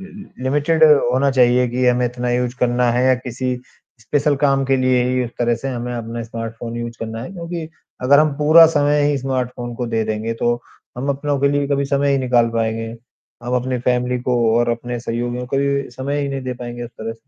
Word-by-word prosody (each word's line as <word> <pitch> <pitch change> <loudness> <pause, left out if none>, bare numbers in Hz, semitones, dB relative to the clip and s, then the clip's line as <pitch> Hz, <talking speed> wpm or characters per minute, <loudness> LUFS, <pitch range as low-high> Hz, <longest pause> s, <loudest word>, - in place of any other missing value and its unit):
लि 195 -7 -12
लिमिटेड 150 +4 +1 0.3
होना 135 +2 +2
चाहिए 125 -1 +4
कि 125 +1 0
हमें 125 0 +3
इतना 125 0 -3
यूज़ 125 0 0
करना 120 0 +2
है 125 +1 +1
या 130 - +5
किसी 125 0 -3 0.5
स्पेशल 145 +4 +1
काम 135 -1 +3
के 135 0 +2
लिए 130 -1 +2
ही 125 0 0
उस 115 - -6
तरह 120 -1 +2
से 135 +4 -5
हमें 125 -1 -4
अपना 115 0 -5
स्मार्टफ़ोन 115 +1 -6
यूज़ 120 0 -6
करना 115 0 -5
है, 175 - -8
क्योंकि 170 -2 -6 0.3
अगर 140 +3 +5
हम 155 -1 +3
पूरा 155 +2 +8
समय 145 -2 +2
ही 140 - 0
स्मार्टफ़ोन 125 -2 -3
को 120 0 -3
दे 115 -1 -1
देंगे, 110 +1 -2
तो 120 +1 +1 0.4
हम 135 - -3
अपनों 140 +1 -1
के 140 - +3
लिए 145 0 0
कभी 140 0 +1
समय 140 0 +1
ही 135 - +2
निकाल 125 -2 +2
पाएँगे। 115 0 -1 0.6
हम 125 +1 -2
अपनी 125 0 -1
फैमिली 125 0 0
को 125 0 0 0.2
और 120 0 +1
अपने 120 +1 -3
सहयोगियों 120 +1 -3
को 135 - -2
कभी-भी 140 -1 0
समय 140 +3 -3
ही 140 - -2
नहीं 135 -1 -3
दे 130 0 -3
पाएँगे 120 0 -7
उस 120 - -9
तरह। 115 0 -6
125 Hz, 215 wpm, -19 LUFS, 120-140 Hz, 0.6 s, पूरा